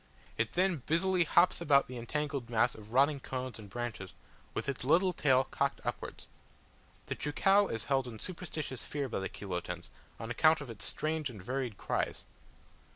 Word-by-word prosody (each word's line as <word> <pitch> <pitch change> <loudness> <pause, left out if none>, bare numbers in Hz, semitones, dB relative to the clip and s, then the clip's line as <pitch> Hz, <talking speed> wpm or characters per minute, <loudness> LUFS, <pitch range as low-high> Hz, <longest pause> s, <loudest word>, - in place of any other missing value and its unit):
It 115 0 -1
then 185 -1 +3
busily 180 +2 +3
hops 170 +3 +4
about 140 -2 +4
the 125 -1 -6
entangled 140 0 -2
mass 120 +1 +3
of 110 0 -12
rotting 140 +3 +4
cones 130 -2 -5
and 105 -2 -10
branches, 115 -4 -5 0.4
with - - -2
its 140 -2 -2
little 175 +7 +4
tail 130 -5 +4
cocked 140 +1 -1
upwards. - - -4 0.8
The - - -2
cheucau 195 +7 +3
is 115 -1 -4
held 135 -2 +1
in 115 -2 -7
superstitious 155 - -4
fear 145 -2 -3
by 120 - -2
the 95 - -3
Chilotans, 90 -3 -5 0.3
on 115 +1 -5
account 155 +6 +5
of 145 -5 -7
its 110 - -5
strange 155 -2 -1
and 110 -5 -9
varied 125 +1 -3
cries. - - -2
135 Hz, 170 wpm, -32 LUFS, 115-155 Hz, 0.8 s, account